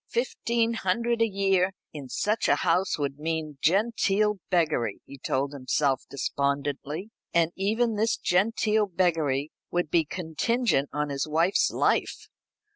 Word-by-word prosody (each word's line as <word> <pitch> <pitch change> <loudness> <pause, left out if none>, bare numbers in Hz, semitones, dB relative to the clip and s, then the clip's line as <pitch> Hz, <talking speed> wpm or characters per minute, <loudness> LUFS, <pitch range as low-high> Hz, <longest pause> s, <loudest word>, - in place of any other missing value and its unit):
Fifteen 235 -1 0
hundred 230 +3 0
a 230 - +5
year 195 -2 +1 0.2
in 140 -4 -8
such 210 - 0
a - - +4
house 190 +1 +2
would 140 -1 -3
mean 155 -2 -3
genteel 210 +1 +2
beggary, 155 - +1
he 140 - -12
told 135 +2 -1
himself 135 0 0
despondently. 140 - -2 0.2
And 170 -1 +3
even 220 +3 0
this 220 +1 +1
genteel 210 +3 +1
beggary 160 -6 0 0.2
would 175 -3 -1
be 170 -2 +4
contingent 165 - 0
on 150 0 -2
his 140 +1 -2
wife's 165 +5 +2
life. - - 0
175 Hz, 130 wpm, -27 LUFS, 145-210 Hz, 0.2 s, a